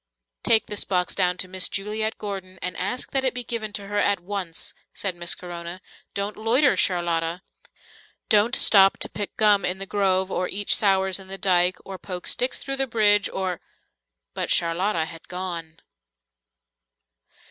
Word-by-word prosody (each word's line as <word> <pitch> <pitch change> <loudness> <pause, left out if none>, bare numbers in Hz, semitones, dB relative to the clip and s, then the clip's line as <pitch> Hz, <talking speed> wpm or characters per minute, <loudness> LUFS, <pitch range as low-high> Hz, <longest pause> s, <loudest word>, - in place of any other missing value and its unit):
"Take 225 -1 +4
this 210 - -1
box 180 -2 -1
down 180 -2 +1
to 185 - -2
Miss 185 0 -1
Juliet 215 +2 -2
Gordon, 190 -3 -6
and 180 -1 -3
ask 200 +9 -3
that 270 -1 +1
it 260 -2 +1
be 250 - -2
given 220 -2 -4
to 200 - -5
her 205 +1 -1
at 200 -1 +2
once," 180 -2 -5 0.2
said 195 -3 -2
Miss 175 0 -2
Corona, 175 0 -7 0.4
"Don't 200 +1 -2
loiter, 245 +6 +3
Charlotta. 170 -1 0 0.8
Don't 215 +4 +4
stop 195 -2 +6
to - - -2
pick 205 -1 -5
gum 210 -3 +4
in 180 +1 +1
the 195 - -5
grove, 190 -1 +1
or 180 - -1
eat 205 +1 -3
sours 190 -2 +3
in 190 - -12
the 195 +1 -5
dike, 180 -1 +2
or 190 -1 -8
poke 180 -2 -7
sticks 250 +1 +1
through 275 -1 -3
the 270 0 +1
bridge, 205 -3 +4
or 185 -2 -3 0.4
" - - -61
But - - -3
Charlotta 170 +1 +1
had 165 0 -12
gone. 170 -3 -6
190 Hz, 170 wpm, -24 LUFS, 180-210 Hz, 0.8 s, stop